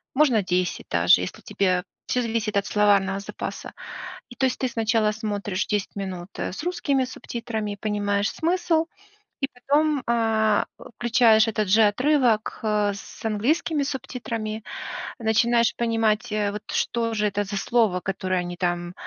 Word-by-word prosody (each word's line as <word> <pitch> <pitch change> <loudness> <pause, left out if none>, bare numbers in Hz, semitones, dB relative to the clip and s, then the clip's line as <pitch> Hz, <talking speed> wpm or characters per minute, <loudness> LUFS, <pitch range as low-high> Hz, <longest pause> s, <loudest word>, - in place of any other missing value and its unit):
можно 255 -8 +4
10 180 0 -1
даже, 85 +1 +5
если 90 - -5
тебе 185 -2 0 0.2
всё 250 - +1
зависит 225 -3 -1
от 200 - +1
словарного 200 -2 +3
запаса. 200 - -6 0.6
И 245 - -11
то 265 - +1
есть, 255 - -3
ты 260 - 0
сначала 225 -2 +1
смотришь 205 -3 -3
10 205 -1 -2
минут, 190 -2 -5
э, - - -2
с 295 - -6
русскими 280 -7 0
субтитрами 225 -4 -4
и - - -10
понимаешь 205 -1 0
смысл, 330 -1 +1 0.6
и 275 - 0
потом, 290 +2 +1
а, 220 -2 +2 0.3
включаешь 230 -2 +5
этот 215 -2 -1
же 220 +4 +5
отрывок, 240 +1 +2
э, 210 -2 +1
с 200 - -11
английскими 285 +8 +1
субтитрами, 230 -5 -4 0.6
начинаешь 235 +1 +3
понимать, 225 -2 +1 0.2
вот 210 - -5
что 230 -1 0
же 210 -1 +1
это 205 +1 -1
за 200 0 -4
слово, 220 -5 +2
которое 185 0 -1
они 175 0 -5
там 175 0 -1
215 Hz, 150 wpm, -24 LUFS, 200-240 Hz, 0.6 s, даже